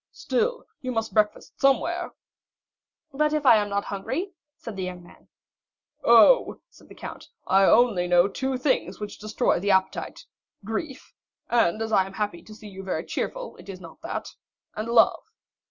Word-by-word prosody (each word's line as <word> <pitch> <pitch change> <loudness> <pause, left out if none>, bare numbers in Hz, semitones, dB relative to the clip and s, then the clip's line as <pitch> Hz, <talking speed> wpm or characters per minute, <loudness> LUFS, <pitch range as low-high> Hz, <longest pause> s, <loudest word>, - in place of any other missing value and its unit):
"Still 480 +1 -1 0.2
you 255 - -3
must 225 -2 -2
breakfast 210 -1 0
somewhere." 275 -1 +1 1.0
"But 300 +2 +1
if 305 -2 -1
I 235 -4 +8
am 205 -1 -1
not 200 0 -1
hungry?" 285 - -4 0.2
said 230 - -8
the 190 - -5
young 180 -1 -5
man. - - -19 0.8
"Oh," - - +6
said - - -20
the - - -13
count, - - -9 0.2
"I 195 +1 +4
only 205 -6 +4
know 175 +1 +5
two 265 +6 -2
things 250 - -1
which 210 -1 -7
destroy 215 -1 0
the 200 +3 -2
appetite,—grief—and 220 - -2
as 220 - -5
I 190 -3 +3
am 195 - -11
happy 200 -4 -3
to 215 +4 -13
see 215 0 -12
you 190 -1 -9
very 190 -1 -3
cheerful, - - -4
it - - -14
is 185 -2 -7
not 165 -3 -13
that—and 215 +2 -8
love. 235 -1 +4
215 Hz, 160 wpm, -25 LUFS, 190-255 Hz, 1.0 s, I